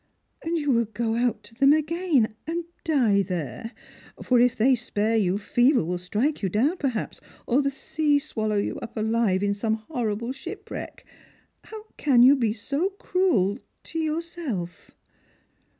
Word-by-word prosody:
" - - -48
And 335 +1 -1
you 290 -3 0
will 235 -2 +3
go 225 +1 -2
out 240 -1 0
to - - -14
them 275 +4 +5
again, 310 -6 +1
and 340 +1 -2 0.2
die 240 -11 +3
there! 180 - -4 0.5
For 250 -2 +3
if 245 0 +4
they 255 +5 +4
spare 225 -2 -1
you, 195 -3 +2
fever 240 - +2
will 180 +1 -2
strike 215 - -1
you 195 - 0
down, 265 - +1
perhaps, 255 -8 -3 0.2
or 255 +4 +2
the 275 - +1
sea 295 +2 0
swallow 220 -8 -2
you 200 - -2
up 230 0 -9
alive 215 -3 +1
in 200 0 +1
some 220 +2 -1
horrible 225 -1 -3
shipwreck. 270 - -8 0.6
How 435 -1 -9
can 255 -5 +4
yo« 260 +3 +8
be 235 -5 +1
so 280 - -2
cruel 255 - +1
— - - -49
to 325 - -5
yourself?" 310 - -4
240 Hz, 165 wpm, -25 LUFS, 215-295 Hz, 0.6 s, yo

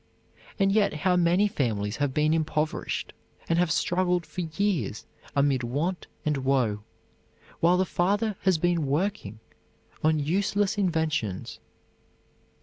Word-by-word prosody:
And 195 -1 +3
yet 205 -1 +3
how 180 +4 +1
many 180 +3 +3
families 110 - -2
have 145 -2 0
been 150 +3 +2
impoverished, 155 -1 -2 0.3
and 165 0 +2
have 175 -1 +2
struggled 180 +2 +1
for 185 - -5
years 160 - -1 0.3
amid 140 -2 +2
want 150 +10 -2 0.2
and 150 -1 +1
woe, 130 -6 +1 0.8
while 175 +2 +4
the 185 - +2
father 205 +5 0
has 190 -3 +3
been 170 -2 +1
working 145 - -1 0.7
on 155 0 +3
useless 195 +7 0
inventions. 160 - -1
165 Hz, 125 wpm, -27 LUFS, 140-185 Hz, 0.8 s, while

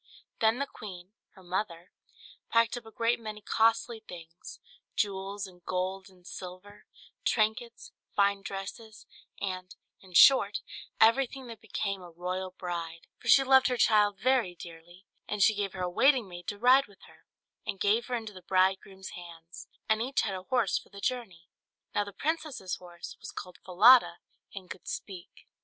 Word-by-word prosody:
Then 220 +1 +3
the 280 - -1
queen, 190 -6 -10 0.2
her 190 - -16
mother, 180 -1 -4 0.6
packed 230 0 +3
up 240 -2 -8
a - - -11
great 230 +1 +1
many 215 -2 -7
costly 225 +3 +1
things 170 -5 -11 0.4
jewels, 200 -1 -2
and 180 -2 -15
gold, 190 +1 -3
and 180 -2 -22
silver; 185 +3 -10 0.4
trinkets, 220 +1 0 0.2
fine 200 0 +3
dresses, 205 +3 -8 0.3
and, 185 -2 -5 0.3
in 185 -2 -17
short, 210 -2 +7 0.4
everything 260 +3 +3
that 230 - -10
became 200 -2 -3
a 175 - -11
royal 180 +2 -4
bride; 170 -3 -6
for - - -11
she 275 - +7
loved 265 0 +6
her 250 - 0
child 210 -3 +4
very 245 -8 +1
dearly: 175 +2 -13 0.2
and 210 -1 +1
she 220 - +6
gave 200 -2 -3
her 185 -1 -4
a - - 0
waiting 255 +5 +3
maid 175 -1 -10
to 205 - -3
ride 255 +5 +5
with 200 -2 -21
her, - - -19 0.4
and 195 - -5
give 215 +4 +2
her 250 - -1
into 220 -3 -5
the 185 - -11
bridegroom's 190 +1 0
hands; 170 -1 -11 0.2
and 220 0 +2
each 260 +3 0
had 200 - -2
a 185 - -5
horse 235 -1 +1
for - - -19
the 200 - -11
journey. 200 -8 -3 0.5
Now 205 - +1
the 200 - -8
princess's 295 - -3
horse 175 -1 -10
was - - -9
called 180 -1 -9
Falada, 215 +2 +6 0.4
and 190 -2 -8
could 180 - -10
speak. 185 -2 -8
200 Hz, 170 wpm, -29 LUFS, 180-225 Hz, 0.6 s, short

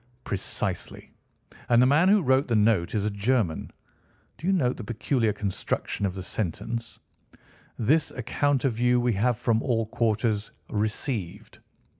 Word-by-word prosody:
"Precisely. 100 - -4 0.6
And 120 -1 +5
the 125 - +6
man 150 +8 +4
who 205 -2 +4
wrote 130 +1 +3
the 120 - +1
note 105 -5 +2
is 105 -1 0
a 105 - 0
German. 100 -4 0 0.7
Do 170 - -4
you - - +4
note 130 -10 +1
the 120 - -6
peculiar 115 +1 0
construction 100 0 -2
of 95 - -5
the 95 - -5
sentence—'This 115 - -3
account 135 +3 0
of 120 -4 0
you 125 0 +3
we 120 -1 +1
have 115 +4 +1
from 115 -1 +1
all 115 -4 0
quarters 110 -1 0 0.2
received. 105 - -3
115 Hz, 145 wpm, -26 LUFS, 105-130 Hz, 0.7 s, the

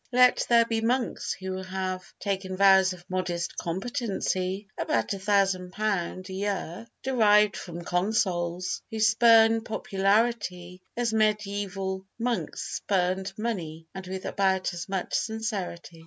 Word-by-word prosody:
Let 250 0 +5
there 235 -1 +6
be 225 -1 -1
monks 240 +2 0
who 190 0 -5
have 185 0 -4
taken 190 -2 -3
vows 190 -1 +6
of 180 -1 -10
modest 180 -2 -2
competency 195 -1 -2
(about 115 -1 0
£1000 195 -1 0
a 190 - -7
year, 195 0 -3 0.2
derived 210 -5 +4
from 175 -1 -7
consols), 180 -1 0
who 220 - -5
spurn 225 0 +5
popularity 195 -4 0 0.2
as 235 -2 0
medieval 200 -3 -1
monks 235 0 -2
spurned 190 0 0
money—and 185 -4 -5
with 190 0 -5
about 190 -2 +1
as 175 +2 -6
much 190 -2 -3
sincerity. 200 -6 -3
195 Hz, 115 wpm, -27 LUFS, 185-220 Hz, 0.2 s, there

